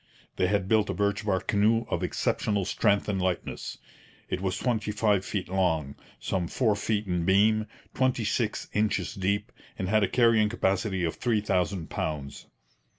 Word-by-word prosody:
They 90 - +2
had 100 -1 0
built 110 -1 +3
a - - -2
birch 100 +1 0
bark 95 -3 0
canoe 110 +3 +3
of - - -2
exceptional 100 -3 0
strength 100 +1 +1
and 100 -3 -1
lightness. 90 -1 -3 0.5
It 90 - -1
was 95 -1 -1
twenty 110 -4 -1
five 105 -2 +2
feet 95 -3 -3
long, 80 -7 0 0.3
some 90 -3 -2
four 110 0 +1
feet 105 +1 -1
in 90 -3 -1
beam, 105 +4 +3 0.3
twenty 130 -3 +1
six 110 +1 -1
inches 105 0 0
deep, 100 0 -1 0.3
and 95 - -3
had 110 +1 +3
a - - +3
carrying 115 -3 +4
capacity 95 -3 0
of 80 - -2
three 115 -3 +1
thousand 90 -4 -1
pounds. 70 -3 -4
100 Hz, 165 wpm, -27 LUFS, 95-110 Hz, 0.5 s, carrying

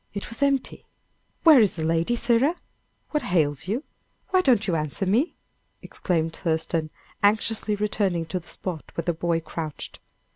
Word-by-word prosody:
It 200 - -5
was 230 - -8
empty. 275 -2 0 0.6
"Where 315 -5 +8
is 210 -5 +4
the 160 - -2
lady, 165 +7 +1
sirrah? 240 +7 +2 0.6
What 300 -3 0
ails 155 - +1
you? 230 +9 -1 0.5
Why 370 -1 +4
don't 245 - +3
you 180 - 0
answer 155 +4 -2
me?" 230 - +1 0.5
exclaimed 165 -3 -1
Thurston, 160 -1 -1 0.3
anxiously 215 +1 +2
returning 200 -5 0
to 165 +3 -3
the 175 - -19
spot 175 -5 -6
where 170 - -3
the 175 - +1
boy 165 0 0
crouched. 155 -2 -6
185 Hz, 155 wpm, -25 LUFS, 165-230 Hz, 0.6 s, Where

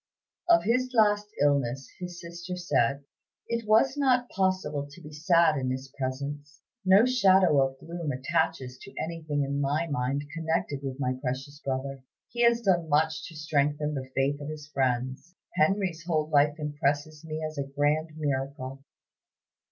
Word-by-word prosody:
Of 340 -1 +6
his 255 +3 +1
last 210 -2 +4 0.2
illness 135 -3 +1
his 180 -1 -6
sister 170 +1 -7
said: 140 -6 +1 0.4
"It 230 -2 -2
was 225 +5 +4
not 255 -4 +2
possible 185 -7 0
to 165 +5 -13
be 150 -3 -11
sad 165 0 +4
in 130 -1 -1
his 130 +1 -5
presence. 140 +2 -5 0.2
No 190 +4 +6
shadow 190 - +5
of 135 0 0
gloom 170 +1 -5
attaches 135 -1 -1
to 200 - -12
anything 160 -3 -2
in 140 +1 -1
my 145 +4 +1
mind 140 -2 -1
connected 160 -3 -1
with 135 -1 -5
my 130 -2 0
precious 135 +2 -4
brother. 135 0 -3 0.3
He 240 - -3
has 235 0 +5
done 175 -6 +2
much 155 0 +1
to 165 - -12
strengthen 150 -1 0
the 130 -2 -5
faith 140 +2 +1
of 145 - -5
his 155 -1 -7
friends. 130 +4 -1 0.2
Henry's 180 0 +1
whole 155 -3 +1
life 145 0 +4
impresses 150 0 -1
me 155 -1 -5
as 155 -1 -5
a - - +1
grand 145 +3 +1
miracle." 135 -2 -3
150 Hz, 160 wpm, -28 LUFS, 140-175 Hz, 0.4 s, Of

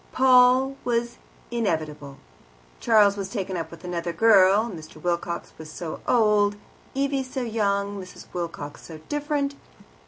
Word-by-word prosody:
Paul 255 +1 +5
was 235 0 -1 0.3
inevitable. 155 -11 -2 0.6
Charles 210 -3 +4
was 195 -1 -4
taken 195 -3 -3
up 165 -2 -4
with 170 +1 -13
another 175 -1 -3
girl, 195 +2 +5
Mr. 165 -8 -9
Wilcox 170 +1 -3
was 155 -1 -9
so 165 -1 -6
old, 210 -3 +3 0.4
Evie 275 0 0
so 260 0 -4
young, 200 -3 -1
Mrs. 185 - -11
Wilcox 165 -4 -5
so 160 - -10
different. 295 -1 -1
200 Hz, 130 wpm, -25 LUFS, 170-240 Hz, 0.6 s, Paul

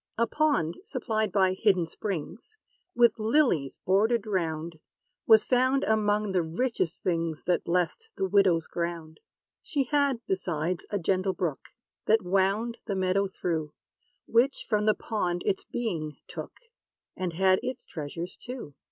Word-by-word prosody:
A 230 - +3
pond, 280 - +1
supplied 220 - -2
by 190 -1 +3
hidden 185 -3 +2
springs, 200 - -6 0.4
With 235 -1 +4
lilies 215 - +2
bordered 215 +4 +3
round, 165 -5 -2 0.5
Was 220 -1 +7
found 260 +2 +2
among 210 -1 +1
the 185 -2 +2
richest 175 +1 -2
things, 165 -3 -1
That 180 0 +1
blessed 180 - -1
the 190 - 0
widow's 185 -4 +3
ground. 170 -2 -4 0.4
She 285 -4 -1
had, 280 -1 +1
besides, 175 -2 -2
a 205 - -1
gentle 190 +1 0
brook, 165 -7 -3 0.4
That 220 -1 +4
wound 195 +6 +1
the 200 - -1
meadow 190 +1 +1
through, 160 -5 -3 0.5
Which 250 +4 +2
from 210 -1 +1
the 215 - +5
pond 180 -6 -2
its 190 - 0
being 170 -11 -3
took, - - -7 0.6
And 180 -2 -3
had 185 +2 +3
its 255 +1 -5
treasures 165 +3 -6
too. 245 - -8
190 Hz, 140 wpm, -28 LUFS, 170-225 Hz, 0.6 s, Was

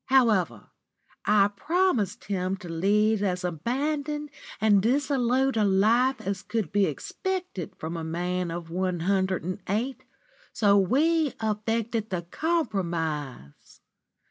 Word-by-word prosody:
However, 215 - +2 0.5
I 205 -1 +5
promised 265 - 0
him 190 -1 -2
to 180 - -10
lead 205 +5 +2
as 180 -2 -1
abandoned 285 - -2 0.3
and 210 -2 +4
dissolute 265 +1 +1
a 220 - +2
life 220 +7 +3
as 195 0 -3
could 210 -6 -3
be 200 0 +3
expected 370 - -4
from 160 +2 -5
a 165 - -4
man 175 +2 -2
of 165 0 -6
one 180 -1 -1
hundred 190 0 +1
and 185 +2 -4
eight, 235 +7 -1 0.5
so 205 -2 +4
we 290 - +2
effected 220 +1 -1
the 180 -2 -2
compromise. 170 - -3
205 Hz, 120 wpm, -27 LUFS, 180-255 Hz, 0.5 s, I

